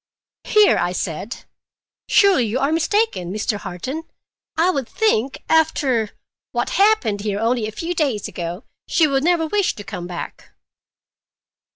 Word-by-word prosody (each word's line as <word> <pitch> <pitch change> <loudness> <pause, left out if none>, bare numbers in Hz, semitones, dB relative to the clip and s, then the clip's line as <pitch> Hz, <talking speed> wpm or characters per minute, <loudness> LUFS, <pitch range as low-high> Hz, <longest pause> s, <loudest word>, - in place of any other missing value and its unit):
"Here!" 425 -1 +5
I 175 +1 0
said. 185 +5 -4 0.6
"Surely 375 - +4
you 220 +4 -1
are 275 +3 +1
mistaken, 330 - +1
Mr. 210 +1 -1
Harton. 255 - -5 0.6
I 345 +3 +4
should 270 -4 -3
think, 275 - 0
after—what 275 -9 0
happened 390 - +3
here 205 -1 -2
only 230 0 +1
a - - -5
few 335 +10 -3
days 275 - 0
ago, 175 +5 -5 0.2
she 325 - +3
would 275 -2 +1
never 340 -1 +2
wish 400 +4 0
to 205 - -8
come 175 -2 -6
back." 175 -1 -8
260 Hz, 140 wpm, -21 LUFS, 205-330 Hz, 0.6 s, Here